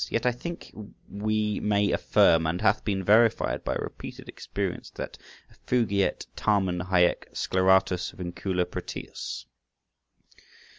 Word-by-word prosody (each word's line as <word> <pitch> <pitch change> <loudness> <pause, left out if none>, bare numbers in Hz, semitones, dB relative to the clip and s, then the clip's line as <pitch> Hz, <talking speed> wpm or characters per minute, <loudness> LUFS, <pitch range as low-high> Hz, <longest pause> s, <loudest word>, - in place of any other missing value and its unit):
Yet 115 - -1
I 125 - +4
think 170 +8 -7 0.4
we 105 +1 -1
may 100 -1 +2
affirm, 80 -1 +4
and 85 +3 -1
it - - -6
hath 100 +2 +3
been 95 -3 -1
verified 110 +4 +3
by - - -1
repeated - - -7
experience, - - -4
that— - - -7 0.3
"Effugiet 100 -6 0
tamen 95 -4 +1
hæc 90 -2 +2
sceleratus 95 -1 +2
vincula 90 0 -2
Proteus." 90 +1 -6
95 Hz, 115 wpm, -27 LUFS, 90-105 Hz, 0.4 s, I